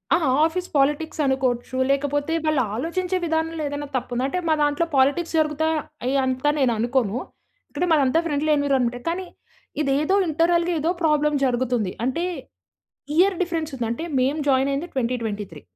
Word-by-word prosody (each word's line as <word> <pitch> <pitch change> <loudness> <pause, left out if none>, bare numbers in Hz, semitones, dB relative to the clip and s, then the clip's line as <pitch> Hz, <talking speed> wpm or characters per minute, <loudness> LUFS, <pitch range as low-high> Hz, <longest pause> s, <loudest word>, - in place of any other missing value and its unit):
ఆ! - - +4 0.3
Office 360 +3 -2
politics 295 +3 +1
అనుకోవచ్చు. 260 -2 0
లేకపోతే 285 +2 0
వాళ్ళు 305 -3 +2
ఆలోచించే 360 +8 -1
విధానంలో 320 0 -1
ఏదైనా 285 0 -4
తప్పుంది. 250 0 -3
అంటే 365 +6 -2
మా - - +5
దాంట్లో 290 +3 +1
పాలిటిక్స్ 285 +6 +2
జరుగుతాయా? 315 +1 +1 0.3
అయ్యి 265 +2 +1
అంత 260 +1 -2
నేను 255 -4 +3
అనుకోను. 240 -2 0 0.5
ఇక్కడ 315 +5 -1
మాదంతా 285 0 +3
ఫ్రెండ్లీ 305 -1 0
ఎన్విరాన్మెంటే 260 -4 +1
కానీ, 365 +3 -3 0.6
ఇదేదో 295 +5 +1
ఇంటర్నల్‌గా 340 +2 +2
ఏదో 315 +3 0
ప్రాబ్లమ్ 300 -1 +2
జరుగుతుంది. 245 -5 0
అంటే 265 +7 -1 0.9
ఇయర్ 380 +2 +4
డిఫరెన్స్ 330 -3 -2
ఉంది. 245 -3 -2
అంటే 235 +7 -4 0.2
మేము 270 +5 +1
జాయిన్ 265 0 +3
అయ్యింది 280 +5 -2
2023. 225 - -3
285 Hz, 145 wpm, -23 LUFS, 255-320 Hz, 0.9 s, మా